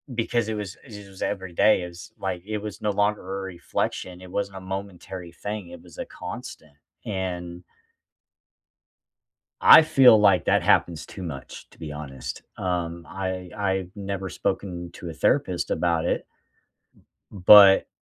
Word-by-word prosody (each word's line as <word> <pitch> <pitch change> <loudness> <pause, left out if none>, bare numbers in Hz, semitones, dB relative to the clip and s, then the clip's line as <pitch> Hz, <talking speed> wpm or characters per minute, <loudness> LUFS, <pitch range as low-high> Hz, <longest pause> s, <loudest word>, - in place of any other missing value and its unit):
because 115 -1 0
it 110 - -2
was 105 -2 -5
it 105 -5 -11
was 95 - -14
everyday 95 +1 +2
is 85 +1 -10
like, 90 -2 -3
it 110 0 -3
was 105 -3 -7
no 105 - 0
longer 105 +1 +1 0.2
a - - -5
reflection. 90 0 -4
It 90 -1 -12
wasn't 100 -1 -3
a - - -8
momentary 95 -2 -7
thing. 105 0 -6
It - - -11
was - - -16
a - - -4
constant. 75 - -9 0.3
And 90 -3 -4 2.0
I 160 - +10
feel 130 -7 +6
like 105 - +4
that - - +3
happens 85 -3 +2
too 95 - -10
much, 70 -6 -8
to - - -21
be 75 -2 -7
honest, 70 -4 -7
um, 85 -2 -3
I 95 -1 -4
I've 95 -3 -1
never 100 -1 -4
spoken 90 -3 -3
to 85 - -7
a - - -6
therapist 90 - 0
about 85 -2 +1
it - - -1 1.1
but 100 0 +8
95 Hz, 150 wpm, -25 LUFS, 85-100 Hz, 2.0 s, I